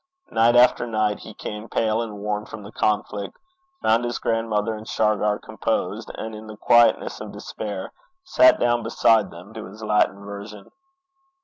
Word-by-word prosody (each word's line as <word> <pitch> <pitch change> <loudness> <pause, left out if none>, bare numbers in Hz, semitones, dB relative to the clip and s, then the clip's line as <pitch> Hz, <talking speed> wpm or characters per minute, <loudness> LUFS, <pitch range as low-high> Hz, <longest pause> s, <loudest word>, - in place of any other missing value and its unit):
Night 115 +1 +4
after 120 0 +5
night 110 -2 0
he 110 - -11
came 105 +2 -7
pale 110 0 +1
and 110 -3 -5
worn 105 0 -2
from 105 - -9
the 105 - -10
conflict, 105 -2 -1 0.5
found 115 +2 +3
his 120 -1 -2
grandmother 115 -1 -1
and 110 0 -9
Shargar 105 -1 +1
composed, - - -3
and 110 0 -6
in 110 0 -9
the 110 -1 -9
quietness 120 +2 +3
of - - -7
despair 100 -3 -6 0.3
sat 320 -3 +5
down 120 0 +2
beside 115 -1 +3
them 90 +5 -12
to 110 -1 -7
his 105 +4 -11
Latin 105 -2 +1
version. 100 0 -9
110 Hz, 165 wpm, -23 LUFS, 105-115 Hz, 0.5 s, after